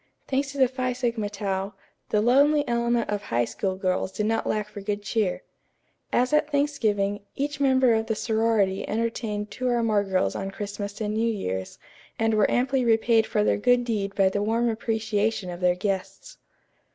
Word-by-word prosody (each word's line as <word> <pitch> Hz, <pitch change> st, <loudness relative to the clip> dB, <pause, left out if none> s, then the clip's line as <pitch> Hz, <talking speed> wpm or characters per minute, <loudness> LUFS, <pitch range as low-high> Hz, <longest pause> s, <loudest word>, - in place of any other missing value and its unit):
Thanks 275 Hz, +1 st, -1 dB
to 280 Hz, -, -9 dB
the 260 Hz, -2 st, +5 dB
Phi 255 Hz, 0 st, -2 dB
Sigma 235 Hz, -4 st, -2 dB
Tau, 195 Hz, -1 st, -3 dB, 0.3 s
the 210 Hz, -, +2 dB
lonely 285 Hz, +5 st, +4 dB
element 235 Hz, 0 st, +1 dB
of 205 Hz, -1 st, -1 dB
High 120 Hz, -, 0 dB
School 190 Hz, -, -3 dB
girls 185 Hz, 0 st, -1 dB
did 210 Hz, -, -2 dB
not 225 Hz, +1 st, 0 dB
lack 210 Hz, -1 st, -1 dB
for 210 Hz, -1 st, -9 dB
good 205 Hz, 0 st, -3 dB
cheer. 210 Hz, -3 st, -1 dB, 0.7 s
As 250 Hz, +4 st, +1 dB
at 300 Hz, 0 st, +3 dB
Thanksgiving, 220 Hz, -9 st, 0 dB, 0.2 s
each 285 Hz, +1 st, -3 dB
member 260 Hz, -3 st, +4 dB
of 220 Hz, 0 st, 0 dB
the 220 Hz, -, 0 dB
sorority 220 Hz, -4 st, +1 dB
entertained 215 Hz, -2 st, -2 dB
two 255 Hz, +4 st, -3 dB
or 240 Hz, -1 st, +1 dB
more 215 Hz, -3 st, +2 dB
girls 190 Hz, -2 st, 0 dB
on 195 Hz, -, -3 dB
Christmas 205 Hz, 0 st, -6 dB
and 210 Hz, 0 st, -1 dB
New 225 Hz, +1 st, +1 dB
Year's, 95 Hz, -, -4 dB, 0.4 s
and 225 Hz, 0 st, +1 dB
were 215 Hz, -1 st, +3 dB
amply 260 Hz, +1 st, +1 dB
repaid 225 Hz, -1 st, +3 dB
for 210 Hz, -2 st, +1 dB
their -, -, +2 dB
good 245 Hz, +3 st, +3 dB
deed 200 Hz, -4 st, -2 dB
by 195 Hz, -1 st, +4 dB
the 205 Hz, +2 st, -2 dB
warm 230 Hz, +3 st, +1 dB
appreciation 220 Hz, -3 st, -1 dB
of 175 Hz, -, -7 dB
their 180 Hz, -1 st, +3 dB
guests. 200 Hz, -, -4 dB
220 Hz, 185 wpm, -25 LUFS, 205-240 Hz, 0.7 s, the